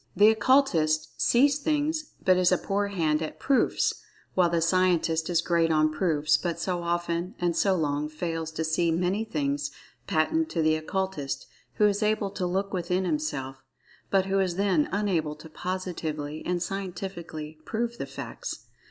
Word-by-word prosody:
The 210 +1 +7
Occultist 210 - +2
"sees 280 +4 +4
things," 305 +1 -1
but 185 - +6
is 180 0 +3
a 185 - +4
poor 200 +3 -1
hand 160 -6 0
at 155 - -5
"proofs"—while 190 -8 0
the 170 0 +1
Scientist 165 -2 +2
is 170 -1 +3
great 170 -1 +2
on 155 0 +3
"proofs," 155 -3 +2
but 170 -2 -3
so 175 0 -1
often, 170 +1 -2
and 175 -1 0
so 195 +1 +3
long, 150 -2 -1
fails 165 0 -3
to 160 - -2
see 160 +2 +1
many 180 +6 0
things 145 -7 -1 0.4
patent 320 - +1
to 165 - 0
the 155 0 +4
Occultist 155 -5 -3 0.3
who 210 - +4
is 205 0 +2
able 210 -2 +1
to 190 -2 -2
"look 195 +3 -1
within" 180 +1 0
himself, 145 -5 -3 0.5
but 195 -1 +3
who 195 0 +1
is 185 -3 0
then 190 -6 +2
unable 175 -7 0
to 150 +2 -12
positively 160 -3 -4
and 175 -1 0
scientifically 175 -5 -6
"prove" 235 +4 -3
the - - -3
facts. - - -7
175 Hz, 160 wpm, -27 LUFS, 155-195 Hz, 0.5 s, The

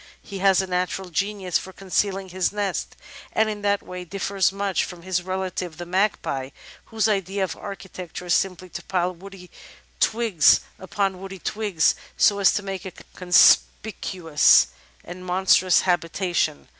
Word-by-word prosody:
He 200 -1 -8
has 195 0 +4
a - - -3
natural 180 0 -2
genius 195 0 -1
for 190 - -10
concealing 195 +1 -2
his 185 0 -1
nest, 205 -3 -3 0.4
and 220 - +2
in 205 -1 -7
that 205 0 0
way 180 0 -7
differs 195 +1 0
very 195 - -12
much 200 -2 0
from 175 -2 -8
his 185 -1 -1
relative, 185 -2 -4
the 175 - -6
Magpie, 175 -8 -1 0.4
whose 225 -1 0
idea 195 -1 -1
of 190 - -3
architecture 190 -3 -8
is 175 - +1
simply 185 -1 0
to - - -7
pile 180 -1 -1
woody 185 0 -13 0.5
twigs 220 -8 +4 0.2
upon 190 0 -2
woody 195 0 -8
twigs, 200 -3 +1 0.2
so 200 -1 +4
as 195 - +5
to 205 - -2
make 195 -2 -5
a 190 -3 -8 0.2
conspicuous 180 -2 +4 0.3
and 180 +1 -9
monstrous 185 0 +3
habitation. 175 - -1
190 Hz, 155 wpm, -23 LUFS, 180-195 Hz, 0.5 s, as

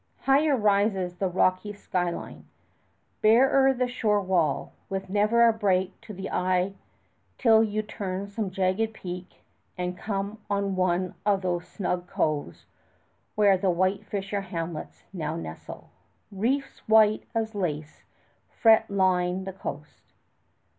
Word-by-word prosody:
Higher 280 +1 +3
rises 200 -4 +1
the 190 - 0
rocky 185 +3 +1
sky 180 -3 -2
line; 170 - -8 0.7
barer 265 +5 +5
the 250 -1 0
shore 215 -4 +1
wall, 175 -6 0 0.2
with 195 -1 -4
never 215 +3 +4
a 230 - +4
break 190 -3 0
to 230 -1 -10
the 190 -1 -6
eye 185 +1 +1 0.6
till 225 -3 +5
you 215 0 -1
turn 195 -2 -4
some 200 0 -3
jagged 190 +4 0
peak 180 -1 -8 0.3
and 180 0 -3
come 200 +2 -4
on 200 -1 0
one 185 0 0
of 200 -2 +1
those 175 -1 -2
snug 180 -1 -3
coves 145 - -2 0.7
where 200 -3 +4
the 190 0 +1
white 185 +3 +1
fisher 200 0 -3
hamlets 165 -4 -6
now 155 -3 -3
nestle. 80 - -8 0.4
Reefs 240 +8 -1
white 215 -1 +4
as 220 -1 -1
lace 155 -6 -4 0.5
fret 225 -1 +4
line 185 -1 +1
the 190 0 -6
coast. 150 -5 -9
195 Hz, 135 wpm, -26 LUFS, 180-215 Hz, 0.7 s, barer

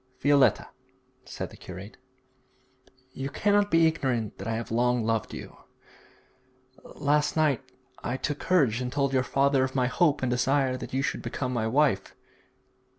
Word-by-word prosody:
'Violetta,' 140 -2 +3 0.6
said - - -6
the - - -13
curate, 95 +4 -10 1.2
'you 135 +1 -4
cannot 205 +6 +2
be 165 -2 +4
ignorant 130 -9 -1
that 95 - -6
I 115 - -1
have 115 0 -5
long 120 +1 +1
loved 115 0 -1
you. - - -9 1.3
Last 145 +1 0
night 150 -4 +2 0.4
I 125 - -2
took 145 +1 -3
courage 135 -11 +2
and 125 0 -3
told 140 -1 0
your 130 - +3
father 135 +1 +2
of 130 0 -3
my 130 -2 +2
hope 145 +3 +1
and 125 - +1
desire 130 +1 +1
that 130 - -7
you 135 - 0
should - - -2
become 130 -2 -3
my 110 -2 0
wife. 140 +5 +1
130 Hz, 155 wpm, -27 LUFS, 125-145 Hz, 1.3 s, be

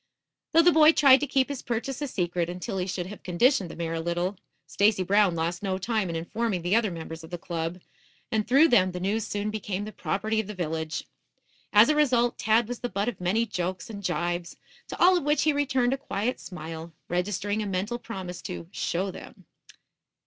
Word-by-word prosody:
Though 330 +1 +7
the 350 - +6
boy 315 0 +7
tried 270 -4 +7
to 290 - -2
keep 270 -1 +2
his 280 -3 -5
purchase 240 +4 -3
a 290 - -1
secret 175 -6 -1
until 185 +3 -4
he 180 - -2
should 180 -1 -3
have 200 +3 -9
conditioned 185 +2 +2
the - - -8
mare 165 -1 -3
a 165 - -2
little, 175 +3 -1 0.3
Stacy 200 -2 +2
Brown 195 -1 +3
lost 170 +2 -2
no 190 -2 -1
time 210 -1 -1
in 165 - -3
informing 185 +3 -2
the 180 +4 +2
other 225 -2 +3
members 165 -1 -7
of 160 - -10
the 175 - -5
club, 165 +1 -4 0.5
and 215 -1 0
through 280 +6 +6
them 185 -7 +4
the 180 - -4
news 205 +4 -1
soon 205 +1 -2
became 205 -2 -3
the 215 - -7
property 215 +2 -1
of 220 - -2
the 210 - -6
village. 160 -2 -3 0.7
As 210 +2 +7
a 305 - +3
result, 245 -5 +2
Tad 220 +1 +3
was 245 0 -5
the 245 - -3
butt 200 +2 -1
of 240 - -8
many 205 +6 +1
jokes 185 +2 -4
and 200 -2 -7
jibes, 175 -1 -2 0.3
to - - -7
all 365 +2 +6
of 350 - 0
which 295 +1 +2
he 310 - +3
returned 265 -3 +1
a - - -1
quiet 225 +4 -2
smile, 165 -2 -8 0.2
registering 205 +4 -1
a 210 - -3
mental 200 +5 -2
promise 185 -7 -7
to 175 -2 -6
"show 190 +1 -2
them." - - -12
200 Hz, 215 wpm, -27 LUFS, 175-240 Hz, 0.7 s, Though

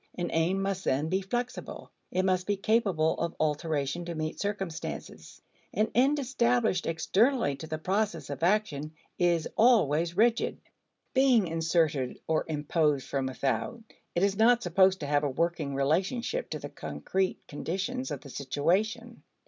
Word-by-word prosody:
An 175 -1 -3
aim 170 +4 +2
must, 195 -1 -2
then, 145 +4 +1
be 190 +2 +1
flexible; 240 +6 -4 0.2
it 185 +1 0
must 185 -1 +1
be 205 -1 +1
capable 195 -7 +2
of 170 0 -2
alteration 150 +1 -1
to 170 -1 -5
meet 155 0 -3
circumstances. 195 -5 -5 0.3
An 215 +1 +1
end 270 +5 +4
established 240 -7 +1
externally 190 - +2
to 160 - -8
the 155 0 -3
process 180 -4 -1
of 140 - -6
action 165 -6 0 0.2
is 170 -2 +2
always 175 - +3
rigid. 230 +2 +2 0.6
Being 260 -6 +4
inserted 160 -5 0
or 160 -1 0
imposed 150 -2 0
from 135 -1 -1
without, 135 - -2 0.3
it 175 - +2
is 200 0 +2
not 235 +3 +4
supposed 190 +1 +3
to - - -3
have 145 +1 +1
a 145 - +1
working 155 0 -1
relationship 190 - 0
to - - -3
the - - -7
concrete 190 0 -2
conditions 200 - -3
of 140 - -5
the 145 - -11
situation. 200 - -1
175 Hz, 150 wpm, -29 LUFS, 155-215 Hz, 0.6 s, end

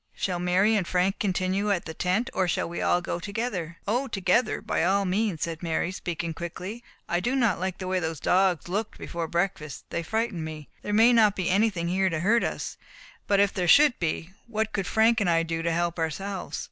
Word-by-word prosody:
Shall 180 -2 -2
Mary 185 +5 +3
and 190 -5 0
Frank 185 +2 +1
continue 190 +1 0
at 185 -4 0
the 160 - -6
tent, 185 +8 0
or 185 -1 +1
shall 175 - 0
we 170 - -5
all 175 - +2
go 175 0 -3
together?" 195 -4 -4
"O 245 +6 0
together, 195 +3 +1
by - - -1
all 195 +3 +2
means," 190 -2 0
said 165 -1 -4
Mary, 170 +1 -1
speaking 170 -2 -4
quickly. 185 +7 -6 0.2
"I 175 - +1
do 240 +8 -1
not 235 -10 +2
like 185 0 -2
the 185 - -6
way 185 0 +1
those 160 -3 -3
dogs 180 +1 +2
looked 205 +4 -3
before 170 -1 -4
breakfast; 170 -5 -2
they 170 - -1
frightened 220 -1 -2
me. 155 -2 -7
There 210 - -4
may 225 +4 +6
not 215 -3 +5
be 185 -2 -1
anything 195 -4 +1
here 190 +2 +2
to 160 -2 -2
hurt 225 +6 +3
us, - - -3 0.5
but 200 -1 +3
if 200 -1 +3
there 180 -3 -1
should 285 - +6
be, 165 +1 -2 0.2
what 220 -1 -2
could 195 -3 -2
Frank 225 +1 +3
and 190 - +2
I 165 -1 +3
do 165 0 -3
to 170 0 0
help 170 0 -1
ourselves?" 190 +5 -3
185 Hz, 215 wpm, -26 LUFS, 170-210 Hz, 0.5 s, may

